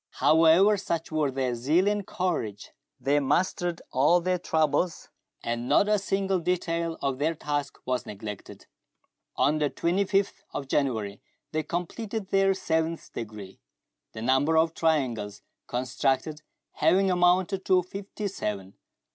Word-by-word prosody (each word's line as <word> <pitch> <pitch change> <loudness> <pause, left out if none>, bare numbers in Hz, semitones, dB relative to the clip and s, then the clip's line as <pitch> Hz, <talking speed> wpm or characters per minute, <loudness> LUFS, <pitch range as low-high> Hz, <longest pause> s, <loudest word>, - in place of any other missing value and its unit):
1 - - +3
69 160 0 +6
ever, 210 0 +4
such 170 -4 -3
were 155 -2 +1
their 130 -2 -1
zeal 150 +11 +2
and 205 -1 0
courage 120 - -3 0.3
that - - -26
they 145 +2 +4
mastered 175 +4 0
all 150 +7 +4
their 180 +1 0
troubles, 160 0 0 0.3
and 120 +1 -3
not 205 - +4
a 210 -1 +3
single 195 -1 0
detail 170 -1 -1
of 135 -1 -1
their 160 +3 +1
task 145 -2 -3
was 125 -1 -2
neglected. 105 0 -8 0.7
On 150 +2 +2
the 150 -1 +1
25th 195 +5 0
of 140 - -4
January 110 -8 -1 0.3
they 155 - 0
completed 195 +6 -4
their 195 0 +3
seventh 160 -2 -2
degree, 105 -4 -8 0.5
the 110 - -6
number 135 +6 +3
of 160 0 +3
triangles 120 -12 -1 0.2
constructed 135 +4 -1 0.3
having 185 +5 +3
amounted 180 +2 +2
to 185 -1 +4
fifty 200 +3 -6
seven. 100 - -4
160 Hz, 140 wpm, -27 LUFS, 130-185 Hz, 0.7 s, 69